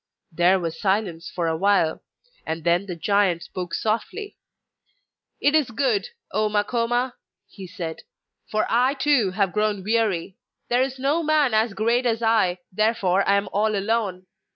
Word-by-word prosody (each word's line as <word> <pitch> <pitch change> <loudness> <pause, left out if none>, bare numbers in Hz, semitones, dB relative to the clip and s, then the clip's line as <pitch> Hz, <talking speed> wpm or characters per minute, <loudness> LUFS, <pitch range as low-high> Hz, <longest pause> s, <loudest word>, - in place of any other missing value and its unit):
There 175 +3 +3
was 165 -2 -5
silence 190 -4 -1
for 175 - -3
a 165 -1 0
while, 190 -3 +2 0.4
and 160 0 -4
then 175 +3 +1
the 180 - -4
giant 190 -1 +1
spoke 180 -2 -5
softly: 370 - -3 1.0
'It 285 - +2
is 305 -5 +3
good, 230 -4 0 0.2
O 215 +2 +1
Makoma!' 235 +4 0 0.3
he 190 -2 -10
said. 170 -4 -6 0.5
'For 215 0 0
I 250 +4 +2
too 265 -7 +2
have 190 0 0
grown 210 -2 0
weary. 210 -4 0 0.3
There 245 +1 +3
is 265 0 -1
no 280 +5 +1
man 305 -4 +2 0.2
so 200 - -13
great 235 +4 +1
as 230 0 -1
I, 220 -6 +2
therefore 195 -2 +1
I 200 - +5
am 200 0 0
all 215 +1 +1
alone. 200 -3 -1
210 Hz, 155 wpm, -23 LUFS, 185-235 Hz, 1.0 s, I